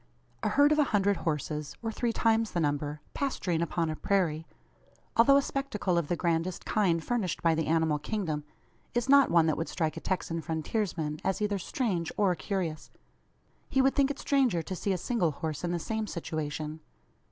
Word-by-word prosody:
A - - +1
herd 290 +1 +5
of 305 - +3
a 300 - +5
hundred 200 -1 +3
horses 150 -1 -3
or 225 - -1
three 235 +1 -1
times 225 -1 +1
the 175 - 0
number 150 -1 -1
pasturing 185 - -1
upon 170 0 0
a 155 - -2
prairie, 165 -4 0 0.7
although 275 +5 +6
a 280 - +3
spectacle 240 -11 -1
of 170 -3 +1
the 175 - 0
grandest 170 +1 -1
kind 175 -6 +1
furnished 220 -9 -1
by 165 -1 +4
the 160 -1 -1
animal 160 -2 +2
kingdom, 155 -4 -2 0.5
is 240 0 +1
not 280 0 +6
one 170 -2 +5
that 155 -2 +1
would 165 - -3
strike 160 -3 -1
a - - -5
Texan 165 -3 -2
frontiersman 160 -1 -2
as 190 - 0
either 205 -1 0
strange, 180 -5 -1
or 200 -3 +3
curious. 175 -4 -3 0.8
He 270 - +1
would 265 +1 +4
think 280 -1 +3
it 285 - -3
stranger 265 - +2
to 185 - -5
see 200 - -1
a 185 - +1
single 180 -4 0
horse 155 +1 -4
in 175 - -1
the 175 - 0
same 220 +5 -3
situation. 155 -2 -4
175 Hz, 190 wpm, -29 LUFS, 160-220 Hz, 0.8 s, although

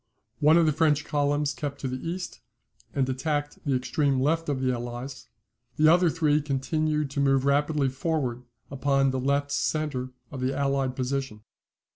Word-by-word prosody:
One 155 +2 +6
of 170 - +5
the 155 - +3
French 150 -1 +2
columns 145 0 0
kept 140 +2 -5
to 135 - -2
the 130 0 -5
east, 180 +1 -5 0.5
and 135 -2 0
attacked 145 +3 -2
the 140 -3 +1
extreme 135 +2 +1
left 160 +4 +1
of 140 -2 0
the 130 -1 +1
Allies; 120 +2 -6 0.5
the 155 0 +5
other 175 0 +4
three 155 -2 +2
continued 150 +1 -1
to 140 - -3
move 135 -1 +3
rapidly 145 0 +2
forwards 130 -3 -2 0.3
upon 135 0 +2
the 130 - -2
left 140 +2 0
centre 145 -4 -1 0.2
of 135 -3 -6
the 130 +2 -1
allied 135 -2 0
position. 130 -4 -3
140 Hz, 165 wpm, -27 LUFS, 130-150 Hz, 0.5 s, One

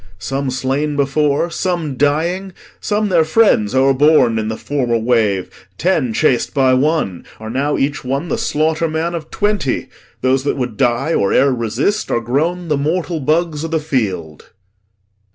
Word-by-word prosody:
Some 135 +9 -3
slain 135 +3 -1
before, 145 +3 +1
some 170 -7 -2
dying, 170 +8 0 0.3
some 210 0 -1
their 170 -3 +4
friends 155 - +2
O'erborne 135 -3 +4
i' 110 0 -2
th' - - -13
former 125 -5 -1
wave. 110 -5 +1 0.3
Ten 160 -9 +1
chas'd 125 +3 +1
by 130 -2 +4
one 130 - 0 0.2
Are 110 0 -7
now 140 +4 0
each 140 +1 -1
one 135 +6 -2
the - - -1
slaughterman 160 +2 0
of 160 -2 -6
twenty. 205 -10 -1 0.3
Those 130 +1 +1
that 145 - 0
would 125 -4 -3
die 120 +9 +1
or 100 - +1
ere 140 0 +4
resist 120 - -1
are - - +1
grown 160 +9 -1
The 150 -3 +1
mortal 165 +3 -1
bugs 155 +2 0
o' - - -2
th' 165 0 -1
field. 95 - -2
LORD. - - -23
140 Hz, 160 wpm, -17 LUFS, 125-160 Hz, 0.3 s, their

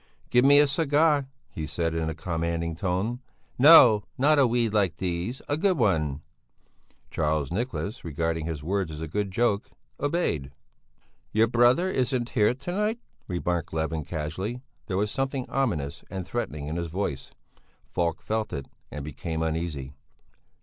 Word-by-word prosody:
"Give 125 0 +5
me 140 +1 +7
a 145 - +7
cigar!" 145 -1 +2 0.2
he 80 -1 -5
said 80 +1 -1
in 80 -1 -1
a 80 - -4
commanding 85 0 -2
tone; 95 +7 -1 0.4
"no, 125 -7 +8
not 145 +3 +4
a 135 - +6
weed 115 -2 +1
like 100 -5 +2
these, 90 +7 -3
a 145 - +1
good 185 +1 +2
one." 75 - +1 0.9
Charles 75 -3 0
Nicholas, 115 +2 -3
regarding 80 0 -2
his 80 -3 -4
words 95 0 -1
as 75 - -7
a 80 - -4
good 100 +5 -2
joke, 100 0 0 0.3
obeyed. 145 - -1 0.8
"Your 110 +1 +4
brother 120 +9 +4
isn't 130 -7 0
here 115 0 +2
to 140 +7 -6
night," 210 +4 0 0.3
remarked 85 -3 -2
Levin 80 0 -1
casually. 90 - -4 0.2
There 95 - -1
was 105 +1 0
something 135 -1 -2
ominous 85 - -1
and 95 -2 -5
threatening 75 -10 -4
in 80 +3 -3
his 85 -1 -2
voice; 85 -5 -4 0.6
Falk 85 -2 -1
felt 110 0 -2
it 70 -2 -4 0.2
and 75 -1 -6
became 80 +2 -4
uneasy. 80 -4 -3
95 Hz, 155 wpm, -26 LUFS, 80-125 Hz, 0.9 s, no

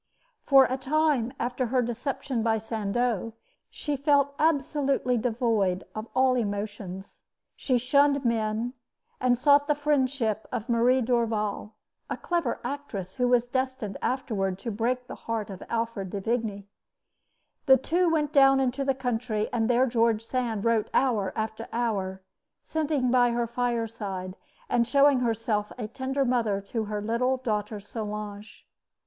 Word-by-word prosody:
For 270 -2 +7
a 260 - -2
time 275 -3 +1
after 245 +1 -1
her 250 +1 +1
deception 240 +1 -3
by 225 0 +2
Sandeau, 225 0 -1 0.4
she 295 -2 -3
felt 280 0 +2
absolutely 280 -4 +1
devoid 220 -5 0
of 215 +1 -5
all 260 0 +4
emotions. 205 -4 -4 0.3
She 255 -3 +1
shunned 280 +2 +3
men, 225 +1 0 0.5
and 250 -1 +2
sought 285 +3 +4
the 295 - +2
friendship 265 -7 0
of 240 -2 -3
Marie 245 +2 +3
Dorval, 225 -3 -1 0.4
a - - -2
clever 340 -8 -1
actress 210 -11 -5
who 250 -1 +2
was 245 -1 +3
destined 260 -5 -2
afterward 200 -8 -1
to 230 - -1
break 245 +4 -1
the - - -8 0.2
heart 220 -3 -2
of 190 - -9
Alfred 230 -4 -2
de 200 - -4
Vigny. 215 -2 -2 1.0
The 265 0 +8
two 345 +7 +1
went 305 -2 0
down 270 -2 +6
into 265 +1 0
the 270 -1 +1
country; 235 -4 -2
and 225 -1 +1
there 245 +1 +4
George 230 -3 +1
Sand 230 -4 -2
wrote 230 -2 +2
hour 220 -8 +2
after 220 +1 -4
hour, 195 -5 -2 0.4
sitting 295 -5 0
by 245 -1 +4
her 235 0 0
fireside, 225 -6 -3 0.3
and 235 -1 +2
showing 280 +1 +5
herself 225 -3 -1
a 225 -4 -4
tender 265 +3 -2
mother 230 -5 +1
to 220 +3 -4
her 210 0 -4
little 250 +4 +1
daughter 215 -4 -2
Solange. 210 0 -7
235 Hz, 145 wpm, -27 LUFS, 215-260 Hz, 1.0 s, The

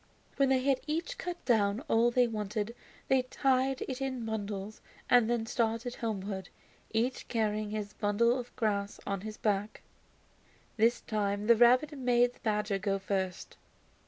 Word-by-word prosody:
When 275 -1 +3
they 260 -1 +2
had 270 -1 +2
each 335 +11 -3
cut 350 -1 -5
down 210 -2 +2
all 235 -5 +3
they 245 +1 +3
wanted 215 0 -3 0.3
they 265 -1 +4
tied 260 +1 +1
it 260 0 -5
in 260 -3 -2
bundles 210 -1 -4 0.3
and 245 -2 +6
then 235 -2 0
started 230 +1 -1
homewards, 195 -4 -4 0.4
each 235 +3 -1
carrying 215 -2 -1
his 210 -1 -4
bundle 235 +5 +2
of 245 0 -9
grass 205 -3 -1
on 195 -2 -2
his 215 +1 -7
back. 210 0 -1 0.9
This 230 +2 +3
time 205 -1 -1
the 235 +1 +6
rabbit 250 +6 +5
made 245 -2 +2
the - - -23
badger 210 -3 0
go 195 0 0
first. 190 -2 -3
225 Hz, 155 wpm, -31 LUFS, 205-250 Hz, 0.9 s, and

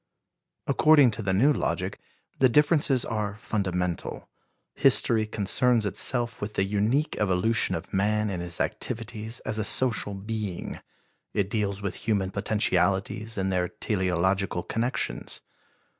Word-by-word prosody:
According 145 -5 +5
to 105 - -5
the 95 -3 -1
new 130 +11 +4
logic, - - -2 0.4
the 130 - +5
differences 150 -1 +3
are 105 -3 -3
fundamental. 90 -5 -3 0.5
History 110 -2 +4
concerns 110 +3 +2
itself 120 +3 +1
with 105 +1 -5
the - - +2
unique 105 +9 0
evolution 105 +3 +1
of - - -7
man 105 +2 +1
in 90 - -4
his 85 -1 -4
activities 115 +1 -3
as 110 - -3
a - - 0
social 115 -3 +1
being. 105 -2 -5 0.6
It 100 -1 0
deals 100 -2 -2
with 100 -2 -2
human 100 -4 -1
potentialities 100 +1 0
in 95 0 -1
their 90 -1 0
teleological 95 -1 -1
connections. 120 +3 -3
105 Hz, 130 wpm, -26 LUFS, 95-115 Hz, 0.6 s, According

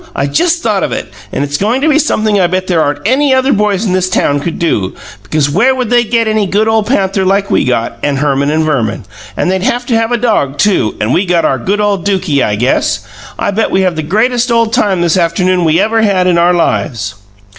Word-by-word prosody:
I 140 - 0
just 335 - 0
thought - - 0
of - - -2
it, - - -5 0.2
and - - -2
it's 145 0 -2
goin' 220 +6 0
to 305 - +1
be 300 -1 +3
sumpthing 215 -9 +1
I 175 - +3
bet 185 +1 -2
there 175 -3 +1
aren't 145 +4 -2
any 265 +2 +2
other 260 +1 +2
boys 210 -1 0
in 185 - 0
this 185 0 0
town 145 -5 +1
could 165 +3 -4
do, 105 - -1 0.3
because 145 +8 -1
where 230 - +2
would 250 -3 -3
they 240 -1 +4
get 230 0 0
any 215 -2 0
good 210 +3 +1
ole 220 0 +2
panther 195 -4 0
like 195 +1 0
we - - +2
got, 120 -2 -2
and 145 -1 -1
Herman 140 0 0
and 155 +1 +1
Verman? 135 -9 -2 0.3
And 180 - 0
they'd 190 0 -1
haf 245 +2 -1
to 240 - 0
have 225 +1 0
a 240 - +1
dog, 210 - 0
too 165 - +1
and 105 +4 0
we 185 +2 +1
got 170 -1 +1
our 135 - 0
good 200 - -1
ole 205 -2 +1
Dukie, 180 -6 0
I 105 - 0
guess. 120 +5 -1 0.3
I - - -1
bet 220 +3 0
we 190 - +1
have 185 -2 0
the 160 - -2
greatest 235 +9 0
ole 230 0 +3
time 205 -4 0
this 170 0 +1
afternoon 180 +1 +1
we 160 +1 +2
ever 220 +3 +1
had 195 -4 +2
in 175 -2 +2
our 175 +1 +3
lives!" 115 -10 -1
190 Hz, 245 wpm, -12 LUFS, 155-220 Hz, 0.3 s, they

